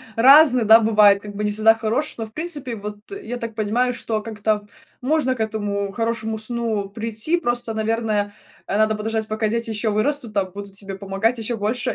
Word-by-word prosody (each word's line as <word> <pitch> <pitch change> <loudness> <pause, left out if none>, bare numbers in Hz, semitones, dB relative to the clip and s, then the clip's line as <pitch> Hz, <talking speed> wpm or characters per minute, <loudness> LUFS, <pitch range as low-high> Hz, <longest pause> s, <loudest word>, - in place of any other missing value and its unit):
разный, 255 0 +7
да, 220 +2 +8
бывает, 210 -3 +5
как 205 -1 -9
бы 210 - -3
не 210 - 0
всегда 220 +1 +4
хороший, 225 +6 -2
но, 225 - -4
в 220 - -16
принципе, 295 -7 -4
вот 210 0 -7 0.2
я 245 -6 -5
так 230 -2 -6
понимаю, 235 +4 0
что 220 -2 -3
как-то 210 -1 -2 0.3
можно 265 -1 +1
к 235 - -14
этому 205 -2 -2
хорошему 225 0 -2
сну 220 -3 -2
прийти, 225 +9 -1
просто, 240 -5 -2
наверное, 220 -2 -1 0.3
э, 200 - -1
надо 215 0 +3
подождать 220 +1 -2
пока 215 0 -1
дети 230 +2 -2
еще 220 0 -1
вырастут 235 +1 0
там, 190 -2 0
будут 200 0 -9
тебе 195 -1 -7
помогать 200 +5 -1
еще 230 +1 -3
больше, 220 +4 -1
220 Hz, 190 wpm, -21 LUFS, 210-235 Hz, 0.3 s, да